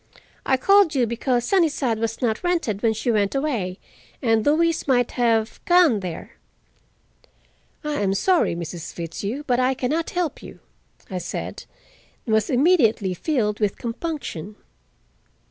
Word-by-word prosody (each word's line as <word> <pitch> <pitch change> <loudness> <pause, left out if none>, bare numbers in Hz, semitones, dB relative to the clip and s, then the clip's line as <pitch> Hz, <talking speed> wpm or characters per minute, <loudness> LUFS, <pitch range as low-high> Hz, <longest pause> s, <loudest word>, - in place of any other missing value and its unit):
I 265 - +3
called 395 +2 +4
you 255 -3 +3
because 240 +1 -1
Sunnyside 290 - +1
was 225 +2 -3
not 225 +4 0
rented 330 - 0
when 225 -1 +2
she 235 +3 -1
went 205 +1 +1
away, 235 -11 -1 0.4
and 225 -4 +2
Louise 320 +4 +2
might 245 -3 +2
have, 230 -2 0
gone 350 - +5
there." 180 -4 -7 1.5
"I 300 -4 -2
am 195 -1 +1
sorry, 355 - +2
Mrs. 170 0 -6
Fitzhugh, 200 - -5
but 245 -3 +1
I 255 +1 +2
can 250 0 -2
not 325 +1 -1
help 350 -5 -2
you," - - -11 0.5
I 185 - -2
said, - - -6 0.6
and 225 - -1
was 220 -1 +2
immediately 245 - +3
filled 210 - -1
with 210 -3 0
compunction. 230 - -5
245 Hz, 145 wpm, -23 LUFS, 210-300 Hz, 1.5 s, gone